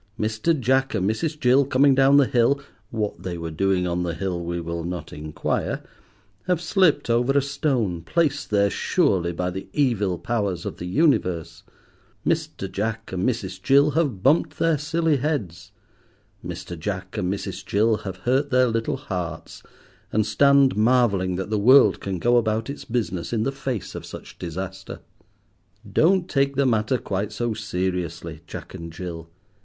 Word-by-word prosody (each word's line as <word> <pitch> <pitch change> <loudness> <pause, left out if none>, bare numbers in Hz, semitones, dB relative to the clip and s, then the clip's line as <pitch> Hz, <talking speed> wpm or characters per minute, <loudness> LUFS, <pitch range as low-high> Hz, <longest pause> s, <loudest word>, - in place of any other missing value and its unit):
Mr. 110 +9 0
Jack 130 +1 +1
and 95 -2 0
Mrs. 150 +8 -2
Jill, 130 +2 +4
coming 140 +1 +4
down 135 +1 +5
the 140 - +6
hill—what 120 -5 -1
they 90 -2 -4
were 85 -1 -5
doing 95 +2 +1
on 90 0 -1
the 85 -2 -2
hill 90 -2 -3
we 85 0 -3
will 85 0 -4
not 90 +1 -5
inquire—have 100 - -4
slipped 175 -1 +2
over 120 +3 +2
a - - +5
stone, 135 - -1
placed 150 - 0
there 100 -1 +2
surely 95 - +1
by 90 +1 -2
the 95 +2 -6
evil 105 -10 +1
powers 100 -4 -2
of - - -5
the 90 - -6
universe. 90 - +1 0.6
Mr. - - -1
Jack 110 +2 -3
and 95 +4 0
Mrs. 95 -6 -4
Jill 140 +4 +4
have 135 - 0
bumped 150 +5 +3
their 165 -3 +2
silly 160 0 +1
heads. 105 - -3 0.7
Mr. 90 - -6
Jack 95 +1 -4
and 90 +1 -1
Mrs. 100 - -5
Jill 110 +2 +2
have 95 -3 -7
hurt 135 +4 +2
their 130 -1 +3
little 115 +3 -1
hearts, 90 - -6 0.5
and 110 0 +2
stand 140 +5 +4
marvelling 105 -5 +2
that 95 +3 -4
the 105 - +1
world 115 -2 +6
can 95 -1 -3
go 120 +7 +3
about 110 +1 0
its 145 - -9
business 110 -8 -2
in 110 -2 0
the 135 - 0
face 135 -5 -4
of - - -7
such - - -10
disaster. 95 +3 -6 0.9
Don't 180 +2 +3
take 140 -3 +1
the 140 +1 +2
matter 115 +1 +2
quite 100 -1 -3
so 120 +2 -2
seriously, 90 -6 -3
Jack - - -8
and 85 0 -7
Jill. 80 -1 -7
110 Hz, 160 wpm, -24 LUFS, 90-135 Hz, 0.9 s, the